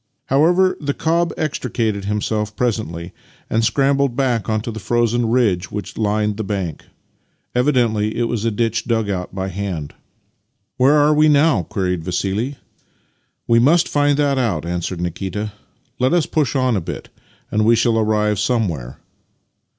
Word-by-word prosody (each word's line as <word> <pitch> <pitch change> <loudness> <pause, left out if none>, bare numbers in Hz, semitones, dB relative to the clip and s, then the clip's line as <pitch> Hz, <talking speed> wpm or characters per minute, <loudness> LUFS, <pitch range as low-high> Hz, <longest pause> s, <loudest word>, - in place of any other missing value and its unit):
However, 175 +7 +4
the 145 -1 -2
cob 170 +2 +1
extricated 115 -8 -2
himself 105 +1 -2
presently, 100 -8 -2 0.4
and 115 +1 +2
scrambled 140 +1 +2
back 120 -6 0
onto 110 +1 -1
the 110 - -6
frozen 120 +2 +1
ridge 105 -7 +1
which 105 -1 -6
lined 105 -1 0
the 110 - -2
bank. 95 -6 -4 0.7
Evidently 120 -5 +1
it 120 - +1
was 115 -2 -2
a 115 - +2
ditch 115 +1 -1
dug 115 -3 0
out 90 0 -4
by 95 0 -2
hand. 90 -6 -4 0.4
" 120 +3 -51
Where 135 +3 +5
are 150 0 +4
we 155 +1 +4
now? 145 - +4
" - - -33
queried 90 -3 -1
Vassili. 100 - -2 0.4
" - - -45
We 115 0 +5
must 160 +8 +4
find 145 -1 +2
that 140 -2 +2
out," 100 - -1
answered 85 +1 -3
Nikita. 95 +4 -3 0.2
" - - -42
Let 130 +4 +2
us 175 -3 +3
push 150 -3 0
on 130 -3 +2
a 95 - 0
bit, - - -7 0.4
and 110 - +2
we 115 +2 +5
shall 115 0 +2
arrive 105 -2 +1
somewhere." 90 - -1
115 Hz, 165 wpm, -19 LUFS, 100-130 Hz, 0.7 s, Where